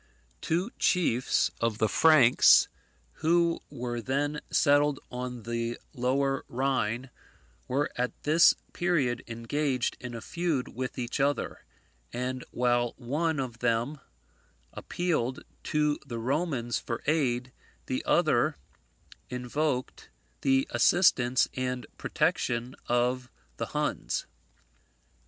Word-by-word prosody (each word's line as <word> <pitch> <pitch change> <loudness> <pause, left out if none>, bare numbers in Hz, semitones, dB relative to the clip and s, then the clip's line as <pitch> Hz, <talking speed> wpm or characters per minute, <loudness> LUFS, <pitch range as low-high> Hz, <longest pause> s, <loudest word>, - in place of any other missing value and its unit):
Two 180 +8 -1
chiefs 130 -9 +2
of 115 -2 0
the 110 - +2
Franks, 140 -3 +6 0.5
who 170 +1 +3
were 120 -1 -4
then 145 +4 -1
settled 145 -1 +3
on 125 -1 -5
the 115 +1 -2 0.2
lower 135 +1 0
Rhine, 130 -1 -1 0.6
were 140 +3 0
at 125 0 -3
this 160 +3 +6 0.2
period 150 -9 0
engaged 125 +3 -1
in 125 -1 -7
a - - -5
feud 160 0 -2
with 130 +1 -5
each 125 +2 -3
other: 140 -1 -1 0.5
and 125 +1 -3
while 120 -1 +1
one 150 +5 -1
of 120 -3 -4
them 120 +5 0 0.7
appealed 155 -8 -2 0.2
to 150 -1 +1
the 120 - -6
Romans 130 -1 -1
for 115 - -5
aid, 130 -5 0 0.3
the - - -2
other - - +2 0.7
invoked 125 +2 -2 0.3
the 135 0 +3
assistance 130 -9 +4
and 125 -1 -3
protection 120 +2 0
of 125 +1 +1 0.3
the - - -3
Huns. - - -2
130 Hz, 105 wpm, -28 LUFS, 120-150 Hz, 0.7 s, Franks